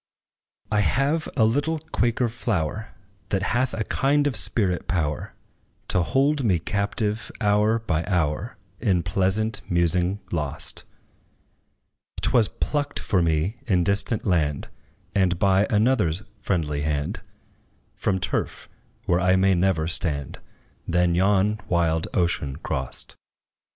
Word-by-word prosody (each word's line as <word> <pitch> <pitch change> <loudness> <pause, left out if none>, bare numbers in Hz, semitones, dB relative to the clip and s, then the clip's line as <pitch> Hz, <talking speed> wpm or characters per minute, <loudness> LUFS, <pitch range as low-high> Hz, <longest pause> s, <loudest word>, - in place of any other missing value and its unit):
I 105 - +2
have 140 +9 +1
a 110 - +5
little 145 +8 +1
Quaker 125 -6 0
flower, 110 -3 -2 0.4
That 95 -1 0
hath 130 +2 +1
a 110 - -1
kind 145 +5 +1
of 145 - 0
spirit 95 -6 +1
power 75 -5 -2 0.5
To 90 - +2
hold 140 - +1
me 95 -7 +3
captive, 105 +4 -2
hour 105 +1 +3
by 90 -8 -1
hour, 90 +4 -1 0.2
In 95 -7 +1
pleasant 100 +3 +1
musing 90 +2 +1
lost; 75 -5 -2 1.3
'T - - 0
was 115 -4 +4
plucked 145 -1 -2
for 95 -4 +1
me 85 +6 0
in 90 -5 +3
distant 100 +4 +1
land, 75 -7 0 0.4
And 95 -3 +2
by 95 +2 +3
another's 105 -5 +2 0.2
friendly 75 -6 -1
hand, 75 -1 -2 0.7
From 95 - -1
turf - - -3 0.4
where 85 0 +2
I 90 +1 +3
may 95 +1 +4
never 85 -3 +1
stand; 75 -5 0 0.5
Then 90 0 +2
yon 100 +3 +2
wild 85 -2 +1
ocean 85 -6 0
crossed. 65 -4 -3
95 Hz, 125 wpm, -24 LUFS, 85-110 Hz, 1.3 s, a